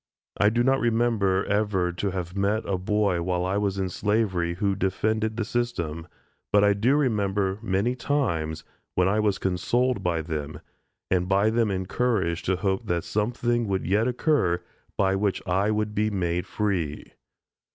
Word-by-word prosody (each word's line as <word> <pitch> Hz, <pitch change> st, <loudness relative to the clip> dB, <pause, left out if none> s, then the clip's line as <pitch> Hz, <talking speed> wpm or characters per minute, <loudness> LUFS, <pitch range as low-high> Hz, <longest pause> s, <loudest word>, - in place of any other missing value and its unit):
I 105 Hz, -, +4 dB
do 120 Hz, +2 st, +1 dB
not 135 Hz, +1 st, +3 dB
remember 115 Hz, -5 st, +1 dB
ever 100 Hz, -4 st, +1 dB
to 90 Hz, +3 st, -2 dB
have 90 Hz, -1 st, -5 dB
met 100 Hz, +3 st, +1 dB
with 100 Hz, -, -2 dB
a -, -, +1 dB
boy 100 Hz, -2 st, +1 dB
while 90 Hz, 0 st, -1 dB
I 95 Hz, +2 st, 0 dB
was 100 Hz, -2 st, 0 dB
in 95 Hz, -1 st, 0 dB
slavery, 95 Hz, -4 st, 0 dB
who 100 Hz, +1 st, 0 dB
defended 110 Hz, +4 st, -1 dB
the 115 Hz, -, -1 dB
system, 85 Hz, -10 st, -2 dB, 0.4 s
but 105 Hz, 0 st, +5 dB
I 100 Hz, 0 st, +5 dB
do 115 Hz, +8 st, +2 dB
remember 100 Hz, -7 st, 0 dB
many 110 Hz, +3 st, 0 dB
times, 85 Hz, -, -1 dB, 0.3 s
when 90 Hz, 0 st, +3 dB
I 105 Hz, +3 st, +2 dB
was 105 Hz, -2 st, +1 dB
consoled 115 Hz, +6 st, 0 dB
by 85 Hz, -3 st, -1 dB
them, 75 Hz, -2 st, -5 dB, 0.5 s
and 90 Hz, -1 st, +1 dB
by 100 Hz, +3 st, +3 dB
them 115 Hz, -1 st, +2 dB
encouraged 95 Hz, -2 st, -1 dB
to 95 Hz, -, +2 dB
hope 95 Hz, 0 st, -1 dB
that 85 Hz, -1 st, 0 dB
something 120 Hz, +2 st, 0 dB
would 95 Hz, -1 st, -1 dB
yet 105 Hz, +5 st, +2 dB
occur 125 Hz, -, +1 dB, 0.3 s
by 95 Hz, -1 st, +2 dB
which 100 Hz, 0 st, 0 dB
I 95 Hz, +3 st, +1 dB
would 105 Hz, 0 st, -1 dB
be 105 Hz, +1 st, +1 dB
made 90 Hz, -3 st, -1 dB
free. 90 Hz, -8 st, -2 dB
100 Hz, 170 wpm, -26 LUFS, 90-110 Hz, 0.5 s, but